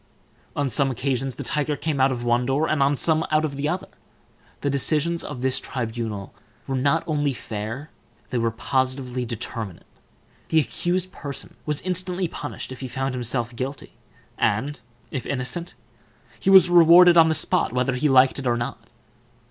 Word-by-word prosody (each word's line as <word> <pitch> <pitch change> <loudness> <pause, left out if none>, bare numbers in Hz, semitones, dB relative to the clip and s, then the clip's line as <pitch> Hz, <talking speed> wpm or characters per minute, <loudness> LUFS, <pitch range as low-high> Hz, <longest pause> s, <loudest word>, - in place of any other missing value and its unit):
On 145 -1 0
some 135 +1 +1
occasions 130 0 -2
the - - -5
tiger 150 0 -1
came 150 -3 -1
out 135 +1 +4
of 120 -2 -3
one 120 +1 +2
door, 140 +4 +1
and 155 -2 0
on 140 +1 +3
some 160 +3 +2
out 155 0 +2
of 145 -2 -4
the 145 +2 -1
other. 180 +3 -2 0.8
The 145 - 0
decisions 155 +4 0
of 130 -4 -6
this 130 -1 +1
tribunal 110 -5 -5 0.3
were 135 - -2
not 140 +2 +2
only 145 -3 0
fair, 115 +5 -6 0.4
they 125 - 0
were 115 0 +1
positively 130 +1 -1
determinate: 115 -4 -6 0.6
the 160 - +4
accused 180 +4 -1
person 140 -5 -8
was 150 -1 0
instantly 180 0 -1
punished 145 -4 -7
if 130 - -8
he 130 - -5
found 130 +2 -3
himself 120 -1 -1
guilty, 135 +3 -5 0.5
and, 130 +7 0 0.3
if 130 - -4
innocent, 140 +7 -3 0.6
he - - 0
was 190 -2 +8
rewarded 175 0 +7
on 165 -1 +7
the 160 - +2
spot, - - +2
whether 125 +1 0
he 145 +4 +1
liked 130 +1 +5
it 130 - -3
or 120 -1 +2
not. 120 0 -5
135 Hz, 170 wpm, -24 LUFS, 125-155 Hz, 0.8 s, was